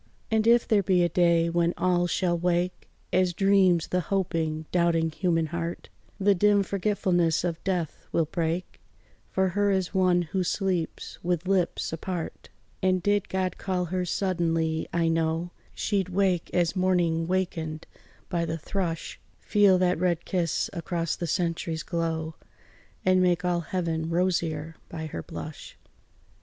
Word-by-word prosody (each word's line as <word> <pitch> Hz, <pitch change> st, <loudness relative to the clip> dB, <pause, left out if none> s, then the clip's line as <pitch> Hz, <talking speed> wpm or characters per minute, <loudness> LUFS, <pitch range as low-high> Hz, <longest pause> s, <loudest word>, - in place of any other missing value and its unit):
And 220 Hz, 0 st, +2 dB
if 235 Hz, 0 st, +5 dB
there 215 Hz, -2 st, +4 dB
be 180 Hz, -1 st, +3 dB
a 175 Hz, -, +2 dB
day 170 Hz, -1 st, +3 dB
when 170 Hz, 0 st, +1 dB
all 175 Hz, -1 st, +2 dB
shall 175 Hz, -1 st, +1 dB
wake, 175 Hz, +1 st, -1 dB, 0.2 s
As 180 Hz, -1 st, +3 dB
dreams 190 Hz, -4 st, +3 dB
the 180 Hz, -, +1 dB
hoping, 165 Hz, -4 st, -1 dB
doubting 170 Hz, -2 st, +2 dB
human 165 Hz, 0 st, +1 dB
heart, 170 Hz, +2 st, -5 dB, 0.3 s
The 200 Hz, +1 st, +4 dB
dim 205 Hz, +2 st, +4 dB
forgetfulness 185 Hz, -4 st, +1 dB
of 170 Hz, -2 st, -3 dB
death 180 Hz, -5 st, -2 dB
will 165 Hz, -, +2 dB
break 165 Hz, +2 st, -3 dB, 0.5 s
For 190 Hz, 0 st, +1 dB
her 205 Hz, +2 st, +1 dB
as 190 Hz, -2 st, 0 dB
one 180 Hz, -2 st, +3 dB
who 185 Hz, +3 st, -2 dB
sleeps 180 Hz, -3 st, -2 dB
with 175 Hz, 0 st, -1 dB
lips 185 Hz, -4 st, 0 dB
apart; 170 Hz, +1 st, -5 dB, 0.3 s
And 185 Hz, -1 st, +2 dB
did 205 Hz, -1 st, +1 dB
God 185 Hz, -1 st, -2 dB
call 185 Hz, -2 st, -1 dB
her 185 Hz, -1 st, +1 dB
suddenly, 165 Hz, -3 st, 0 dB
I 170 Hz, -1 st, +1 dB
know 165 Hz, +1 st, 0 dB, 0.2 s
She'd 195 Hz, -3 st, 0 dB
wake 185 Hz, -2 st, +1 dB
as 175 Hz, 0 st, +1 dB
morning 175 Hz, -3 st, +1 dB
wakened 165 Hz, -4 st, -2 dB, 0.4 s
by 170 Hz, -1 st, -1 dB
the 165 Hz, 0 st, -2 dB
thrush, 165 Hz, 0 st, -3 dB, 0.2 s
Feel 205 Hz, -3 st, +4 dB
that 180 Hz, -1 st, +2 dB
red 175 Hz, -2 st, 0 dB
kiss 170 Hz, -4 st, 0 dB
across 170 Hz, -2 st, -2 dB
the 170 Hz, -, -4 dB
centuries 165 Hz, -1 st, -1 dB
glow, 165 Hz, -1 st, -2 dB, 0.7 s
And 185 Hz, 0 st, +4 dB
make 180 Hz, 0 st, +2 dB
all 175 Hz, -1 st, +1 dB
heaven 165 Hz, -2 st, -2 dB
rosier 165 Hz, -3 st, -1 dB
by 160 Hz, -1 st, -5 dB
her 140 Hz, -, -5 dB
blush. -, -, -8 dB
175 Hz, 150 wpm, -27 LUFS, 165-185 Hz, 0.7 s, if